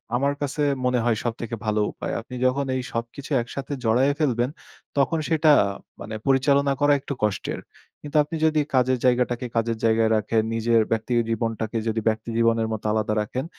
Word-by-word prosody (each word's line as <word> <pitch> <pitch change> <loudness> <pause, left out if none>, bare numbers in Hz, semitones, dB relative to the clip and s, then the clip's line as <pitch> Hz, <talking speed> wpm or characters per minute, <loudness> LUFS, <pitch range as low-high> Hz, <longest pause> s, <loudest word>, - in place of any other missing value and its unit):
আমার 140 +3 +1
কাছে 145 +1 -2 0.2
মনে 125 -1 +2
হয় 115 -3 +1
সবথেকে 115 0 -3
ভালো 105 0 +1
উপায়। - - -5
আপনি 125 +2 -10
যখন 140 +2 +1
এই 130 - -1
সবকিছু 115 +5 -5
একসাথে 135 +4 -6
জড়ায়ে 125 +5 +3
ফেলবেন 125 -4 +1 0.5
তখন 140 +4 +2
সেটা 160 -1 +4 0.5
মানে 110 +1 -6
পরিচালনা 140 +1 +3
করা 145 0 +5
একটু 140 +1 -5
কষ্টের। 105 -2 -1 0.4
কিন্তু 150 +1 -3
আপনি 150 +3 -6
যদি 155 -1 +3 0.2
কাজের 130 0 +3
জায়গাটাকে 125 0 +1
কাজের 115 0 0
জায়গায় 110 0 +3
রাখেন, 110 +1 +1
নিজের 115 0 +3
ব্যক্তি 115 +2 -1 0.2
জীবনটাকে 115 0 -2
যদি 110 0 0
ব্যক্তি 110 +1 0
জীবনের 115 -1 +2
মত 110 - -5
আলাদা 110 0 0
রাখেন, 125 +7 -4
120 Hz, 170 wpm, -24 LUFS, 115-140 Hz, 0.5 s, করা